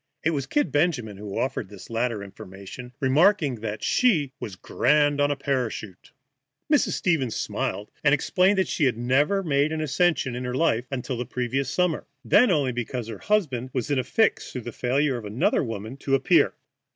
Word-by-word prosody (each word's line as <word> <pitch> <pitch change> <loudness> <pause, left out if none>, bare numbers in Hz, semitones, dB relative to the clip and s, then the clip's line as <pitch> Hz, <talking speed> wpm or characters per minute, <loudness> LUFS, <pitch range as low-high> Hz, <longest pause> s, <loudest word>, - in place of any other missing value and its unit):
It 160 - +2
was 140 -4 -2
"Kid" 290 - 0
Benjamin 140 - 0
who 100 -1 -6
offered 120 -6 -2
this 100 -2 -11
latter 115 -2 -2
information, 100 +5 -10
remarking 145 - +3
that 110 -1 -4
she 165 - +2
was 100 - -6
"grand 145 - +2
on 145 - +3
a 145 - 0
parachute." 125 -8 -3 0.6
Mrs. 290 - +3
Stevens 145 -10 0
smiled, 105 - -3
and 145 - +5
explained 185 +7 +3
that 190 - +2
she 150 - 0
had 125 -4 +1
never 145 +11 +2
made 145 -2 +1
an 160 - -2
ascension 155 -3 +1
in 125 - -4
her 125 0 -3
life 130 -5 +1
until 130 -1 -3
the 125 - -3
previous 125 +2 -2
summer, 180 0 0 0.2
and 115 - -15
then 245 +5 +6
only 145 -7 +2
because 120 -1 -4
her 110 - -7
husband 135 - 0
was 130 +1 -2
in 140 - +2
a - - 0
fix 220 - +1
through 125 - -5
the 120 - -7
failure 130 +3 0
of 115 - -8
another 105 +5 +1
woman 115 +1 -6
to 135 -1 +1
appear. 135 - +3
130 Hz, 190 wpm, -25 LUFS, 120-150 Hz, 0.6 s, then